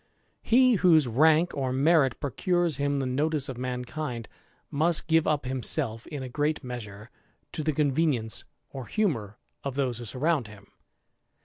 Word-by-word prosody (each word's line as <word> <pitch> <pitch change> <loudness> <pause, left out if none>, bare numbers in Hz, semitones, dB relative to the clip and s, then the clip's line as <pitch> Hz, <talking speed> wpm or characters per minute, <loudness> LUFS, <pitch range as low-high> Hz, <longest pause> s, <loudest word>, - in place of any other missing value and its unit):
He 255 +1 +4
whose 165 -7 +5
rank 155 +8 +4
or 130 -2 -1
merit 135 -1 +3
procures 170 +2 0
him 140 0 0
the 135 - -1
notice 145 +2 0
of 130 - -6
mankind 125 0 -4 0.4
must 160 +3 +1
give 160 -1 +2
up 145 -3 0
himself, 125 -2 -1
in 145 -3 -6
a - - -5
great 150 +4 -1
measure, 110 -3 -8 0.4
to 155 - -4
tk 155 -1 -1
convenience 140 -6 +1 0.3
or 130 -3 -7
humour 120 - -1 0.3
of 140 -2 -4
those 130 -4 -1
who 120 - -7
surround 135 +2 0
him. 100 -2 -14
140 Hz, 150 wpm, -27 LUFS, 125-155 Hz, 0.4 s, whose